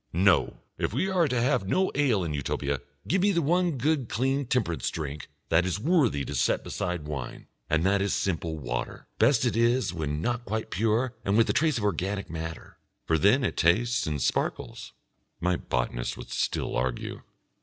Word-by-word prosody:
No! 95 +1 +3 0.2
If - - -1
we 165 +11 0
are 180 -4 +3
to 125 -3 0
have 120 -6 +1
no 190 - +2
ale 130 -9 +2
in 80 -3 -3
Utopia, 70 -1 -2 0.3
give 190 +1 +2
me 205 +2 +4
the 170 -3 +1
one 175 0 +2 0.3
clean 135 +3 0
temperance 110 -11 0
drink 75 -3 -5 0.2
that 85 +2 +4
is 95 +2 -1
worthy 130 - +2
to - - -5
set 60 - +1
beside 90 -4 -3
wine, 75 -4 -6 0.2
and 80 +2 +2
that 100 +1 +3
is 100 - 0
simple 80 -4 -1
water. - - -4
Best - - +4
it - - +1
is 115 -3 +2
when 75 -3 -2
not 120 +7 -1
quite 110 0 -3
pure 115 - +1
and 100 +2 +1
with 115 +1 +5
a - - -2
trace 155 -4 +2
of 110 - -3
organic 100 0 -1
matter, 80 -1 -7 0.3
for 80 -1 +2
then 110 - +4
it - - -1
tastes 115 +8 +2
and 75 -2 -1
sparkles.... - - -2 0.5
My 90 +1 +1
botanist - - -2
would - - -9
still - - -1
argue. 65 -1 -2
100 Hz, 185 wpm, -27 LUFS, 80-125 Hz, 0.5 s, with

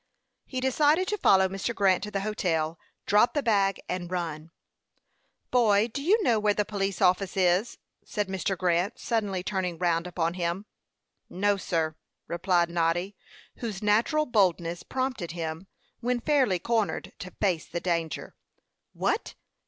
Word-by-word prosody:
He 260 - -3
decided 295 +7 +3
to 420 - 0
follow 190 -1 +5
Mr. 195 +5 -3
Grant 195 -3 +3
to - - -6
the 195 -1 -2
hotel, 165 -6 -1 0.3
drop 210 +7 +4
the 290 - +1
bag, 200 -4 +2
and 180 -1 -3
run. 165 -3 -4 1.0
"Boy, 220 -3 +4
do 280 - -5
you 405 +8 +3
know 230 - +3
where 210 -1 +2
the 210 - +1
police 195 -3 -2
office 185 +1 +2
is?" 185 +4 +2 0.3
said 210 -2 -2
Mr. 190 0 -2
Grant, 180 +4 +1
suddenly 205 -5 -1
turning 185 -4 -2
round 170 0 +1
upon 170 -1 -1
him. 175 +2 -2 0.6
"No, 205 +2 +1
sir," 165 -5 -1 0.3
replied 170 0 +1
Noddy, 175 +3 0 0.4
whose 215 -4 -5
natural 230 +9 +3
boldness 180 - +1
prompted 255 -10 -3
him, 165 +1 -5 0.3
when 245 +1 0
fairly 260 -8 +2
cornered, 220 +4 -1
to 185 - -6
face 180 -6 0
the 175 - -3
danger. 170 -3 -2 0.6
"What! - - -1
195 Hz, 145 wpm, -27 LUFS, 175-220 Hz, 1.0 s, follow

